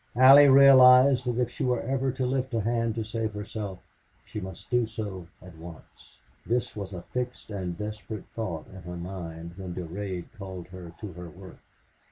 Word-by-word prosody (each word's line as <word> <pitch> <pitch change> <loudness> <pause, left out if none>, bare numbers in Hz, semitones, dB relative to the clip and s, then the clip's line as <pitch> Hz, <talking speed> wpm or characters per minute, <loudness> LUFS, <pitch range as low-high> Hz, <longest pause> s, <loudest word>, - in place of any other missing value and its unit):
Allie 135 +3 +9
realized 130 -1 +7
that 120 -1 -1
if 120 -1 0
she 130 - -5
were 125 -2 0
ever 135 +1 -1
to 130 -1 -2
lift 130 -1 -1
a 115 - +1
hand 115 0 0
to 115 - -2
save 110 -1 -3
herself 105 -2 -6 0.4
she 105 - -6
must 95 +3 -10
do 120 -2 +2
so 100 -5 -6 0.2
at 90 -2 -13
once. 80 0 -14 0.3
This 120 +1 -1
was 100 -2 -6
a 90 -3 -7
fixed 125 -3 -5
and 90 -4 -4
desperate 105 0 -6
thought 95 -9 -4
in 95 - -10
her 90 0 -7
mind 85 -2 -7
when 90 -2 -7
Durade 90 +1 -5
called 95 -3 -8
her 90 -2 -10
to 105 -4 -7
her 90 0 -9
work. 95 +2 -13
105 Hz, 185 wpm, -27 LUFS, 90-125 Hz, 0.4 s, Allie